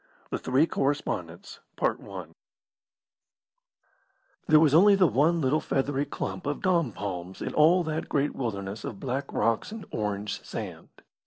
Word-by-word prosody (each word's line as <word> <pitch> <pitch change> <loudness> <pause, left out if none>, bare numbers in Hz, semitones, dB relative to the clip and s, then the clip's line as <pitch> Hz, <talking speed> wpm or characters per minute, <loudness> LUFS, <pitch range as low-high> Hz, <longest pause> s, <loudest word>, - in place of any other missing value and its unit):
THE - - -1
THREE 130 +5 +3
CORRESPONDENTS 145 -2 -3 2.9
There 155 - +7
was 155 -3 +4
only 200 +5 +7
the 195 -2 +5
one 160 +4 +3
little 140 +3 +2
feathery 135 +1 0
clump 95 -6 -5
of 145 - -3
dom 170 -8 +2
palms 95 -1 -6
in - - -4
all 170 +4 +5
that 160 -1 -3
great 145 0 0
wilderness 100 -4 -4
of 100 - -6
black 135 +1 -3
rocks 115 - 0
and 220 -1 -7
orange 105 -1 -3
sand. - - -7
140 Hz, 135 wpm, -27 LUFS, 110-160 Hz, 2.9 s, There